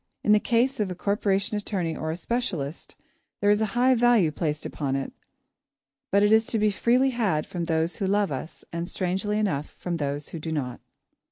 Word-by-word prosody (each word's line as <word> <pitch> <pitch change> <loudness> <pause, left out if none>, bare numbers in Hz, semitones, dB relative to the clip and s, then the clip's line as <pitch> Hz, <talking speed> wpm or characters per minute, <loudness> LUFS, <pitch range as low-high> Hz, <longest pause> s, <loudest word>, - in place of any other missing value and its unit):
In 210 - +3
the 210 - +7
case 245 +4 +1
of 205 -3 0
a 180 - -4
corporation 200 +1 0
attorney 185 -6 -2
or 155 - -4
a 160 - -1
specialist, 180 - -3 0.4
there 205 - +4
is 210 +1 +3
a 220 - +2
high 255 +2 +5
value 240 -9 +4
placed 150 -1 -2
upon 135 -3 -2
it, 135 0 -3 1.0
but 200 +2 +4
it 205 +1 +5
is 220 0 +4
to 225 - 0
be 210 -1 +3
freely 250 +6 +3
had 205 -11 0
from 175 -2 -4
those 160 +1 0
who 195 - -1
love 200 -3 +2
us, 135 +4 -6
and, 170 +1 -3
strangely 190 +3 -1
enough, 155 -9 -1
from 175 -1 -3
those 145 -1 -3
who 165 - -6
do 160 +1 -5
not. 130 -6 -3
190 Hz, 200 wpm, -26 LUFS, 160-215 Hz, 1.0 s, the